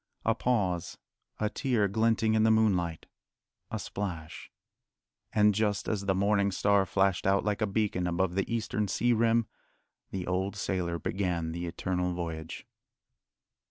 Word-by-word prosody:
A 115 Hz, -, +4 dB
pause, 100 Hz, -8 st, -1 dB, 0.4 s
a 105 Hz, -, +1 dB
tear 120 Hz, -7 st, +1 dB
glinting 110 Hz, +2 st, +2 dB
in 110 Hz, -, +3 dB
the 110 Hz, -, +4 dB
moonlight, 95 Hz, -7 st, +2 dB, 0.6 s
a -, -, -3 dB
splash 85 Hz, -6 st, -5 dB, 0.8 s
and 105 Hz, -1 st, +4 dB
just 105 Hz, -1 st, 0 dB
as 100 Hz, -3 st, -2 dB
the 95 Hz, -, +2 dB
morning 100 Hz, +1 st, +2 dB
star 100 Hz, 0 st, +2 dB
flashed 95 Hz, -1 st, +1 dB
out 95 Hz, 0 st, +3 dB
like 105 Hz, +1 st, -1 dB
a 110 Hz, -, +2 dB
beacon 100 Hz, -3 st, 0 dB
above 90 Hz, +1 st, 0 dB
the 95 Hz, +4 st, -1 dB
eastern 110 Hz, -2 st, -1 dB
sea 120 Hz, +5 st, +2 dB
rim, 115 Hz, 0 st, +3 dB, 0.6 s
the 95 Hz, -2 st, -4 dB
old 95 Hz, +2 st, -1 dB
sailor 90 Hz, -4 st, -2 dB
began 85 Hz, -1 st, -2 dB
the 85 Hz, +1 st, -4 dB
Eternal 90 Hz, +1 st, -2 dB
Voyage. 80 Hz, -1 st, -5 dB
100 Hz, 145 wpm, -29 LUFS, 90-110 Hz, 0.8 s, A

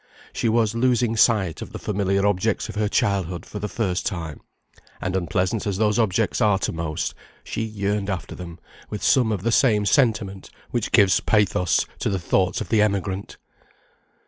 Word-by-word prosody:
She 115 Hz, -, 0 dB
was 110 Hz, -1 st, +2 dB
losing 120 Hz, -1 st, +1 dB
sight 100 Hz, -7 st, +2 dB
of -, -, -8 dB
the -, -, -4 dB
familiar 100 Hz, -1 st, 0 dB
objects 100 Hz, +2 st, 0 dB
of -, -, -7 dB
her 105 Hz, 0 st, 0 dB
childhood 95 Hz, -4 st, 0 dB
for 105 Hz, -, -7 dB
the 105 Hz, -, -3 dB
first 95 Hz, -6 st, -1 dB
time; 80 Hz, -6 st, -4 dB, 0.6 s
and 95 Hz, -, -3 dB
unpleasant 95 Hz, +3 st, -1 dB
as 100 Hz, -2 st, -1 dB
those 105 Hz, +1 st, +2 dB
objects 110 Hz, +1 st, +1 dB
are 105 Hz, -3 st, +4 dB
to -, -, -2 dB
most, 80 Hz, 0 st, -3 dB, 0.3 s
she -, -, -4 dB
yearned 105 Hz, -2 st, -2 dB
after 95 Hz, -3 st, -4 dB
them 85 Hz, -2 st, -9 dB, 0.3 s
with 105 Hz, -, -5 dB
some 125 Hz, -4 st, +3 dB
of 100 Hz, -4 st, -2 dB
the 115 Hz, -, +1 dB
same 110 Hz, -5 st, +3 dB
sentiment 105 Hz, -6 st, +1 dB, 0.2 s
which 120 Hz, -3 st, -2 dB
gives 100 Hz, -5 st, +5 dB
pathos 100 Hz, -4 st, +2 dB
to -, -, 0 dB
the 95 Hz, -, 0 dB
thoughts 90 Hz, +1 st, 0 dB
of -, -, -5 dB
the 110 Hz, -2 st, +3 dB
emigrant. 100 Hz, -2 st, -1 dB
100 Hz, 175 wpm, -23 LUFS, 95-110 Hz, 0.6 s, gives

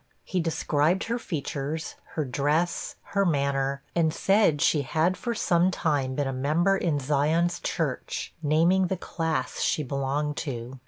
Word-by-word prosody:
He 185 Hz, -, -2 dB
described 165 Hz, +1 st, +1 dB
her 235 Hz, +2 st, -2 dB
features, 155 Hz, -, -4 dB, 0.2 s
her 155 Hz, -, 0 dB
dress, 150 Hz, +6 st, 0 dB, 0.2 s
her 200 Hz, 0 st, +3 dB
manner, 140 Hz, -4 st, 0 dB
and 165 Hz, -2 st, +2 dB
said 195 Hz, -3 st, +3 dB
she 150 Hz, 0 st, +3 dB
had 160 Hz, +7 st, +1 dB
for 235 Hz, +4 st, -3 dB
some 175 Hz, -3 st, +3 dB
time 145 Hz, -7 st, 0 dB
been 145 Hz, -, 0 dB
a 135 Hz, -, -2 dB
member 155 Hz, +9 st, +2 dB
in 170 Hz, -6 st, 0 dB
Zion's 150 Hz, +5 st, +1 dB
Church, 150 Hz, -6 st, -3 dB
naming 165 Hz, +5 st, +3 dB
the 190 Hz, -, -2 dB
class 160 Hz, -7 st, -2 dB
she 155 Hz, -, +1 dB
belonged 140 Hz, +2 st, -2 dB
to. 130 Hz, -2 st, -5 dB
155 Hz, 150 wpm, -27 LUFS, 140-175 Hz, 0.2 s, her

